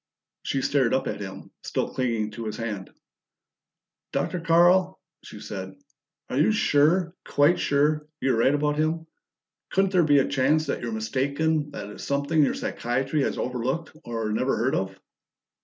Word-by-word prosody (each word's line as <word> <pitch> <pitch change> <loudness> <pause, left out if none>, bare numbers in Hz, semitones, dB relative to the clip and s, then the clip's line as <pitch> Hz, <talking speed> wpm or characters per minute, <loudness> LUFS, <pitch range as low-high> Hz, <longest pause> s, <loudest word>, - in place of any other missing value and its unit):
She 135 -1 -2
stared 135 -4 +2
up 130 - 0
at - - -4
him, 95 -1 -8
still - - -2
clinging 115 -4 -1
to 115 +1 -7
his 110 - -4
hand. 105 -5 -4 1.2
"Dr. 180 - -1
Carl," 175 +3 +4 0.2
she 105 - -10
said, 95 -2 -7 0.5
"are 130 - -1
you 155 - +4
sure 170 -2 +3
quite 145 +5 +3
sure 150 +1 +1
you're 135 - +1
right 130 +5 +4
about 150 0 0
him? 160 +1 0 0.6
Couldn't 195 0 +2
there 185 -2 +4
be 145 -2 +4
a 135 - +3
chance 145 +3 +2
that - - -2
you're 120 -1 -3
mistaken 140 +7 0
that 105 -6 -7
it's - - -9
something 140 +3 +1
your 140 - +2
psychiatry 135 +5 -1
has - - -1
overlooked 130 +7 -3
or 115 -2 -3
never 130 +5 0
heard 120 +5 +1
of?" 95 0 -2
140 Hz, 160 wpm, -25 LUFS, 115-155 Hz, 1.2 s, Carl